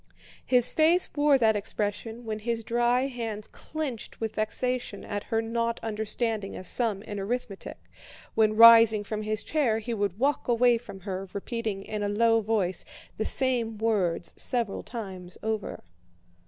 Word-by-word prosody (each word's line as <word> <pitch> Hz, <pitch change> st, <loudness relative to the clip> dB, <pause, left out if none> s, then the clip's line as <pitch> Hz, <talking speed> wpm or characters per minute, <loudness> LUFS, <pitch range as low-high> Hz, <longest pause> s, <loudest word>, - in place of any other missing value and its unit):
His 250 Hz, -2 st, +3 dB
face 330 Hz, +3 st, +3 dB
wore 290 Hz, -1 st, +4 dB
that 220 Hz, -3 st, +3 dB
expression 210 Hz, +3 st, -3 dB
when 215 Hz, -1 st, -3 dB
his 230 Hz, +1 st, -2 dB
dry 240 Hz, +2 st, +2 dB
hands 225 Hz, -5 st, -5 dB
clenched 295 Hz, -8 st, -6 dB
with 220 Hz, -1 st, -3 dB
vexation 230 Hz, 0 st, -2 dB
at 205 Hz, -1 st, -4 dB
her 225 Hz, 0 st, 0 dB
not 230 Hz, +1 st, -1 dB
understanding 220 Hz, -1 st, -2 dB
a -, -, -7 dB
sum 210 Hz, -1 st, 0 dB
in 205 Hz, -2 st, -6 dB
arithmetic, 205 Hz, -1 st, -4 dB, 0.6 s
when 215 Hz, -1 st, +3 dB
rising 230 Hz, -2 st, +8 dB
from 215 Hz, +1 st, -4 dB
his 215 Hz, 0 st, -2 dB
chair 275 Hz, -8 st, +1 dB
he 230 Hz, +2 st, -4 dB
would 200 Hz, -3 st, -1 dB
walk 275 Hz, +4 st, 0 dB
away 240 Hz, 0 st, +4 dB
from 195 Hz, -5 st, -11 dB
her, 190 Hz, 0 st, -5 dB
repeating 215 Hz, -1 st, -4 dB
in 210 Hz, 0 st, -4 dB
a 205 Hz, -, 0 dB
low 225 Hz, +2 st, +3 dB
voice 200 Hz, -5 st, 0 dB, 0.3 s
the 220 Hz, -, -1 dB
same 240 Hz, -4 st, 0 dB
words 195 Hz, -6 st, 0 dB
several 235 Hz, -5 st, 0 dB
times 190 Hz, -6 st, -7 dB
over. 220 Hz, -1 st, -3 dB
225 Hz, 155 wpm, -27 LUFS, 205-240 Hz, 0.6 s, rising